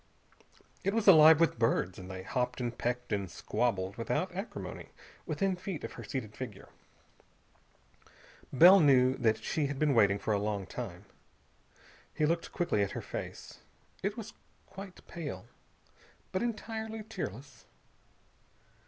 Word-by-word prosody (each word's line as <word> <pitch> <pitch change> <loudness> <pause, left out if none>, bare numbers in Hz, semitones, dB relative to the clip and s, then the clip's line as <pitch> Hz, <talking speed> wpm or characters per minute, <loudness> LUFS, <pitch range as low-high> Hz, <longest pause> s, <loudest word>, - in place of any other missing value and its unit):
It 195 +2 0
was 225 -2 0
alive 160 -3 +9
with 165 -8 +2
birds, 95 -5 +1
and 90 0 -9
they 95 0 -6
hopped 125 +4 -2
and 120 -1 -3
pecked 125 -1 -2
and 100 -3 -2
squabbled 100 -1 -1
without 125 +11 -1
acrimony 195 +5 -6 0.4
within 195 -2 0
feet 180 -2 -6
of - - -6
her - - -9
seated 110 -6 -5
figure. 105 -6 -8 1.8
Bell 180 +8 +8
knew 130 -4 +5
that 110 -4 +1
she 150 -3 0
had 140 0 -4
been 150 0 +2
waiting 100 -4 +4
for 110 - -1
a 100 - +1
long 100 -1 -2
time. - - -7 1.1
He 155 - +2
looked 165 +2 -1
quickly 175 - 0
at 100 - -1
her - - -3
face. - - -7 0.4
It 200 +3 -2
was 225 -1 -7 0.3
quite 195 -1 -11
pale, 145 - -6 0.9
but 185 - -1
entirely 220 -1 -4
tearless. 140 - -7
135 Hz, 140 wpm, -31 LUFS, -, 1.8 s, alive